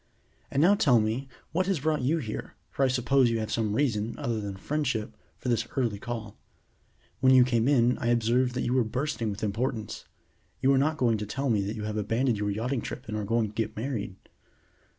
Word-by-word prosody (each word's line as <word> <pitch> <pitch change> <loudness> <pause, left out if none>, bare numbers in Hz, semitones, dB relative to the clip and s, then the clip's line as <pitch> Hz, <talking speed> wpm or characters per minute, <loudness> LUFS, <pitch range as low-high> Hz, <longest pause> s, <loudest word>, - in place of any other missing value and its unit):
And 140 - +2
now 190 +4 +6
tell 130 - +4
me 110 +5 -1 0.2
what 185 +3 0
has 190 -7 0
brought 155 -1 +1
you 145 +7 +2
here, 110 -9 -5 0.2
for 140 - 0
I - - +5
suppose 130 0 +3
you 115 - 0
have 110 - -3
some 110 -2 0
reason, 115 -5 0
other 115 -2 -2
than 100 -2 -5
friendship, 130 -2 -2 0.2
for - - -7
this 115 -2 +1
early 115 -6 0
call. 115 -3 -6 0.8
When 130 +1 +5
you 130 - +8
came 120 -1 +1
in 125 -3 +3
I - - -2
observed 120 +2 +2
that 125 - -1
you 120 - 0
were 130 -1 +3
bursting 125 0 -2
with 100 +1 -5
importance. 110 +2 -2 0.5
You 135 +1 +4
are 135 - +4
not 155 +3 +1
going 115 -6 +2
to 105 - -4
tell 135 +4 -1
me 105 -3 +2
that 105 - -3
you 105 - -5
have 105 0 -3
abandoned 115 +2 0
your 105 0 0
yachting 115 +5 -1
trip 125 - -7
and 110 - -4
are 105 - -2
going 115 0 +1
to - - -14
get 110 -1 -3
married?" 110 -5 -3
120 Hz, 220 wpm, -28 LUFS, 110-135 Hz, 0.8 s, you